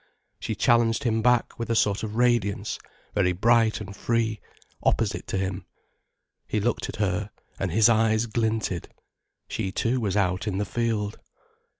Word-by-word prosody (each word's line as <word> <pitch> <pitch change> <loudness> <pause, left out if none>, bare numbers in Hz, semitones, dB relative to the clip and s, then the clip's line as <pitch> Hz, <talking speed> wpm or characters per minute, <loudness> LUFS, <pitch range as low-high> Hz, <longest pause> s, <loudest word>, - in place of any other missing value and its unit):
She - - -3
challenged 115 -1 +3
him 115 -3 +1
back 125 0 +2
with 115 - -3
a 115 - +1
sort 100 -2 +2
of 110 -1 -5
radiance, 120 -4 +1 0.3
very 90 -3 +2
bright 115 +3 +3
and 100 -2 -8
free, 110 -1 0 0.4
opposite - - 0
to - - -2
him. 95 -1 -3 0.8
He 105 - 0
looked 115 +3 -1
at - - -5
her, 100 0 -1 0.3
and 95 -3 -1
his 110 +5 +5
eyes 110 0 +3
glinted. 110 -5 -1 0.6
She 95 - -3
too 120 +6 0
was 105 -4 -1
out 90 +1 0
in 100 -2 -1
the 105 - 0
field. 110 -3 -2
110 Hz, 160 wpm, -26 LUFS, 100-115 Hz, 0.8 s, his